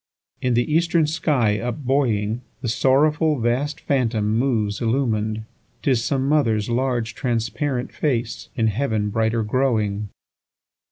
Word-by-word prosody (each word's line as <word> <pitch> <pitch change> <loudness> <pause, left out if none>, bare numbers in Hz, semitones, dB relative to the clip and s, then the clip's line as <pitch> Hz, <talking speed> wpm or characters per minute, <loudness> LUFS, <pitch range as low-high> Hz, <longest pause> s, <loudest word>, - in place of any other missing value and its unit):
7In 125 -2 +1
the 120 +5 +1
eastern 170 0 +3
sky 145 -9 +1
up 125 +3 -4
buoying, 120 -4 +1 0.2
The 120 - -1
sorrowful 150 +5 +3
vast 130 +6 0
phantom 115 -6 0
moves 110 -5 0
illumin'd;('Tis 115 0 -1
some 135 -1 0
mother's 115 -8 +2
large, 120 -2 0
transparent 125 +1 -2
face, 120 -6 -2
In 115 - +1
heaven 110 -2 0
brighter 110 +1 +1
growing.) 105 -4 0
120 Hz, 115 wpm, -22 LUFS, 110-140 Hz, 0.2 s, eastern